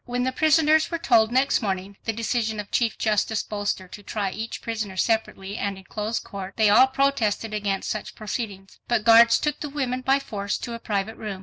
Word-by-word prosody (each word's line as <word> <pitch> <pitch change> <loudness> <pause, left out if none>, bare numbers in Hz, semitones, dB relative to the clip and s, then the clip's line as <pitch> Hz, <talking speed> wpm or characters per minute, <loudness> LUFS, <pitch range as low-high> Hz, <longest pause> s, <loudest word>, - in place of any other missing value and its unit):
When 245 0 -2
the 260 - 0
prisoners 315 +2 +3
were 335 - -2
told 230 -8 +3
next 260 +2 +2
morning 195 -1 -3
the 225 - +1
decision 225 -1 -1
of 205 - -7
Chief 235 -2 +1
Justice 215 0 0
Bolster 205 -3 -3
to 205 - -10
try 200 -1 -3
each 225 +3 -5
prisoner 215 -4 -4
separately 210 -2 -1
and 200 -1 -2
in 190 - -12
closed 210 +4 -3
court, 195 -1 -8
they 215 -2 +4
all 255 +5 +7
protested 260 -6 0
against 200 -2 -2
such - - -5
proceedings. 205 -3 -6
But 235 -2 0
guards 230 0 +7
took 300 -2 -2
the 295 - -5
women 260 -3 -2
by 270 +1 +3
force 205 -7 -3
to 240 - -6
a 230 - -6
private 210 0 -3
room. 205 -3 -6
220 Hz, 205 wpm, -24 LUFS, 205-245 Hz, -, all